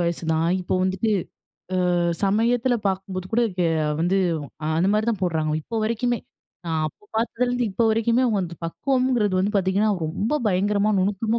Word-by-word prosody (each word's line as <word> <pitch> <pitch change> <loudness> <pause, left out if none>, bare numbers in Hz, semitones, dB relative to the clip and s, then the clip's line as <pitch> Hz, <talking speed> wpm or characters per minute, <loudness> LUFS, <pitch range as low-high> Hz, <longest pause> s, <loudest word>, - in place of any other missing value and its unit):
வயசு 170 0 -1
தான். 160 +1 +1
இப்போ 180 - -2
வந்துட்டு, 190 +4 0 0.8
அ - - +1 0.3
சமயத்தில 235 +5 +2
பார்க்கும்போது 190 -1 -2
கூட 235 - +3 0.3
ஏ - - +2 0.3
வந்து, 180 +4 +2 0.6
அந்த 185 - +2
மாதிரி 215 +1 +1
தான் 210 -4 -3
போடுறாங்கலாம், 155 -3 0
இப்ப 225 +6 -4
வரைக்குமே. 235 +2 0 0.5
நான் 160 -1 0
அப்போ 155 +7 -10
பார்த்ததுலேருந்து, 245 +2 0
இப்ப 230 +4 0
வரைக்குமே 230 +3 +2
அவுங்க 215 -5 +1
அந்த 170 -1 -7
பக்குவம்ங்கிறது 250 +1 +1
வந்து 195 +3 +1
பார்த்தீங்கன்னா, 195 +3 +2 0.2
ரொம்ப 200 - -1
பயங்கரமா 205 +2 +2
நுணுக்கமா 210 +4 0
205 Hz, 155 wpm, -23 LUFS, 185-230 Hz, 0.8 s, கூட